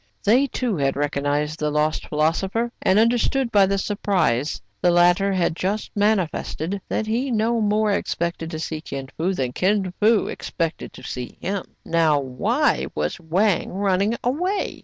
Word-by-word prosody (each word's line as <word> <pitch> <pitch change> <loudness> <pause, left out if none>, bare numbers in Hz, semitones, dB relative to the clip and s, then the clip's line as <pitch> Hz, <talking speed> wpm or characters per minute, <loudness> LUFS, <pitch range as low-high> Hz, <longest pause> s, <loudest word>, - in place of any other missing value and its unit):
They, 245 +7 +4
too, 240 -6 -2
had 135 -1 +1
recognized 145 +1 -1
the 150 - 0
lost 150 +1 0
philosopher, 190 +10 0
and 190 - +3
understood, 235 +3 +2
by 200 -3 +5
the 195 +1 0
surprise 180 - 0 0.2
the 180 - +4
latter 175 +3 +4
had 175 -3 +1
just 200 +5 -2
manifested, 200 -3 0
that 220 - -1
he 235 +5 -1
no 230 0 +1
more 210 0 +2
expected 170 -4 -2
to 160 - -5
see 155 -1 -4
Kin 135 -4 -6
Fo 175 +4 0
than 130 -8 -2
Kin 190 +1 +1
Fo 220 +1 +4
expected 165 -2 -4
to 130 - -12
see 125 -1 -6
him. 195 -1 -3 0.2
Now, 160 -3 +3
why 130 -2 0
was 75 - -2
Wang 180 +4 +1
running 200 +3 +1
away? 360 +11 -1
185 Hz, 160 wpm, -23 LUFS, 155-215 Hz, 0.2 s, by